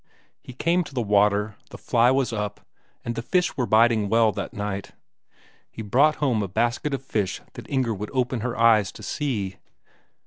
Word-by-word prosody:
He 130 Hz, -, -11 dB
came 170 Hz, +7 st, +1 dB
to 140 Hz, -, -12 dB
the 125 Hz, -, 0 dB
water; 105 Hz, 0 st, +2 dB
the -, -, -10 dB
fly 120 Hz, 0 st, +3 dB
was 130 Hz, -2 st, +1 dB
up, 105 Hz, -2 st, -4 dB, 0.4 s
and 120 Hz, -, -2 dB
the 115 Hz, -, -4 dB
fish 180 Hz, +9 st, 0 dB
were 125 Hz, -3 st, -1 dB
biting 110 Hz, -2 st, +3 dB
well 115 Hz, 0 st, +4 dB
that -, -, -5 dB
night. 105 Hz, -1 st, -5 dB, 0.8 s
He 110 Hz, -, -8 dB
brought 140 Hz, +9 st, +3 dB
home 125 Hz, -7 st, 0 dB
a 100 Hz, -, -2 dB
basket 120 Hz, +8 st, 0 dB
of 135 Hz, -, -8 dB
fish 105 Hz, -7 st, -2 dB
that -, -, -10 dB
Inger 130 Hz, -4 st, 0 dB
would 105 Hz, +1 st, -5 dB
open 125 Hz, -2 st, -1 dB
her 120 Hz, +2 st, -3 dB
eyes 110 Hz, -4 st, +4 dB
to -, -, -12 dB
see! 105 Hz, -10 st, -3 dB
115 Hz, 185 wpm, -24 LUFS, 105-130 Hz, 0.8 s, well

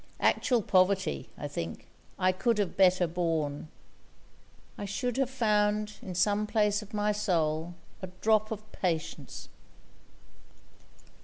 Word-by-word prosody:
Actual 245 Hz, -5 st, +2 dB
poverty, 190 Hz, -1 st, +2 dB
I 145 Hz, -, -4 dB
think, 85 Hz, -, -5 dB, 0.3 s
I 185 Hz, 0 st, +3 dB
could 230 Hz, +5 st, 0 dB
have 200 Hz, -4 st, -1 dB
better 185 Hz, -1 st, +5 dB
borne; 160 Hz, -4 st, -2 dB, 1.1 s
'I 205 Hz, -, -3 dB
should 225 Hz, +5 st, -2 dB
have 270 Hz, -2 st, +1 dB
found, 210 Hz, -4 st, +1 dB
in 185 Hz, -2 st, -7 dB
some 205 Hz, +4 st, +2 dB
place 210 Hz, -1 st, +2 dB
of 210 Hz, -, -12 dB
my 210 Hz, 0 st, +1 dB
soul, 170 Hz, -5 st, 0 dB, 0.3 s
A 185 Hz, -, -4 dB
drop 215 Hz, 0 st, +3 dB
of 215 Hz, -1 st, -5 dB
patience!' 165 Hz, -4 st, -3 dB
200 Hz, 125 wpm, -29 LUFS, 175-210 Hz, 1.1 s, better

